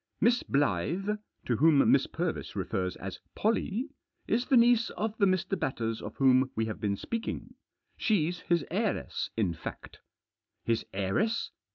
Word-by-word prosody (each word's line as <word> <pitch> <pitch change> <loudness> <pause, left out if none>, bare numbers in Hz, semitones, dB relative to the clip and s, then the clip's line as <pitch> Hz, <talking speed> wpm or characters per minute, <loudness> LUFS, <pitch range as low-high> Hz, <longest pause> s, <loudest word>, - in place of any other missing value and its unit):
" - - -51
Miss 245 0 +1
Blyth 150 - 0
— - - -41
to 120 - +1
whom 150 0 +5
Miss - - +4
Purvis - - -3
refers 90 -1 -2
as 95 0 -7 0.2
Pollie 225 +4 0 0.2
— - - -44
is 240 +2 -1
the 270 - +5
niece 235 -1 +5
of 220 0 -3
the 200 - +5
Mr. 185 +1 0
Batters 115 -4 -2
of - - -7
whom 130 -1 +4
we 110 - 0
have 110 -1 -5
been 100 -1 0
speaking. 230 - -4 0.4
She's 175 -5 +1
his 170 -4 0
heiress, 205 +3 -1
in 100 -6 +1
fact." 80 - -8 0.3
" - - -57
His 115 -1 +1
heiress?" 100 - 0
165 Hz, 170 wpm, -30 LUFS, -, 0.4 s, whom